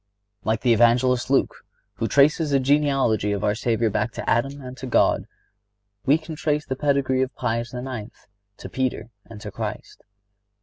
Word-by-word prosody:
Like 110 +1 0
the 125 -2 +4
Evangelist 120 +2 +3
Luke, 135 - +1 0.3
who 115 - -1
traces 150 - +3
the 140 -1 +3
genealogy 135 -7 +2
of 100 - -3
our 105 - +2
Savior 115 0 0
back 110 +3 -1
to - - -6
Adam 135 +4 +1
and 130 -2 -8
to 130 - -6
God, 125 - +2 0.8
we 145 +3 +5
can 160 0 -9
trace 150 -1 -1
the 130 - -3
pedigree 135 -2 +1
of 130 - -2
Pius 115 +1 -2
IX. 125 -3 -5 0.5
to - - -8
Peter 130 -2 -3
and 110 -2 -11
to - - -7
Christ. - - -6
130 Hz, 170 wpm, -23 LUFS, 115-140 Hz, 0.8 s, we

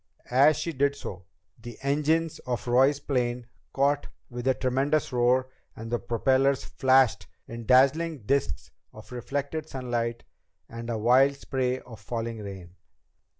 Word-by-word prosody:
As 140 +5 +5
she 170 - -3
did 140 0 +1
so, 95 -9 -8 0.4
the 120 0 -9
engines 150 +3 +1
of 125 0 -4
Roy's 135 +4 +4
plane 125 -4 -1 0.3
caught 140 +1 +1 0.2
with 120 +1 -5
a 130 - +3
tremendous 135 +3 0
roar 125 +1 +2 0.3
and 115 +1 -8
the 120 - 0
propellers 130 +5 +1
flashed 130 -2 +3 0.2
in 115 -1 -8
dazzling 140 +3 +3
disks 135 - -1 0.2
of - - -13
reflected 145 +5 -4
sunlight 120 -2 -3 0.4
and 115 +1 -8
a 115 - -1
wild 130 +5 +4
spray 130 -2 -2
of 115 -4 -12
falling 115 +1 -4
rain. 95 -3 -9
130 Hz, 140 wpm, -27 LUFS, 120-140 Hz, 0.4 s, As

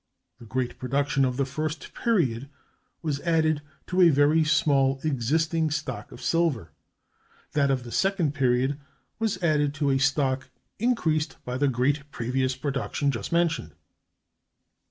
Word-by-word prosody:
The 115 - -12
great 125 +2 -3
production 140 +2 +1
of 125 -1 0
the 140 - +1
first 155 +3 -4
period 140 - 0 0.5
was 145 -3 -1
added 155 -2 +1 0.2
to 185 +1 +1
a 175 - +8
very 150 +2 +4
small 135 -3 +2
existing 155 +4 +1
stock 150 0 -4
of - - -11
silver; 145 - 0 0.8
that 140 -2 +2
of 130 -2 0
the 120 - -9
second 190 - +1
period 130 +1 +1 0.4
was 220 -4 0
added 150 -3 +2
to 145 -2 +1
a 135 - +2
stock 135 -1 +1 0.3
increased 165 -10 0
by 125 - -3
the 145 - +3
great 140 +4 0
previous 130 +1 -1
production 135 0 -1
just 115 -6 -5
mentioned. 165 - 0
145 Hz, 140 wpm, -26 LUFS, 130-155 Hz, 0.8 s, a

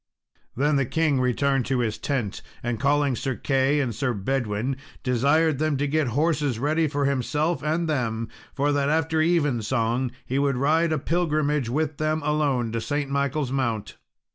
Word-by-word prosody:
Then 145 +3 +2
the 135 - +2
king 155 -3 +1
returned 135 +1 +1
to 130 0 +1
his 110 -3 -2
tent, 120 -9 -2 0.2
and, 120 -2 -2
calling 140 0 +2
Sir 130 +1 -2
Key 135 +3 +1
and 130 -5 -1
Sir 125 +2 -1
Bedwin, 120 +3 -1 0.3
desired 140 +4 +2
them 155 -2 +1
to 145 - 0
get 150 0 +1
horses 150 -5 +1
ready 155 +5 +1
for 145 -1 -1
himself 150 +5 0
and 160 +2 0
them, 115 -6 -1 0.3
for 145 +1 +1
that 145 -1 +1
after 160 +1 +1
evensong 130 -6 +1 0.2
he 135 +2 -1
would 140 -2 +1
ride 160 +5 +2
a 155 - +2
pilgrimage 150 -4 0
with 150 +3 -1
them 155 0 0
alone 145 -6 +1
to 115 0 -2
St. 145 +2 -2
Michael's 140 -1 0
Mount. 115 -6 -2
140 Hz, 165 wpm, -25 LUFS, 125-150 Hz, 0.3 s, Then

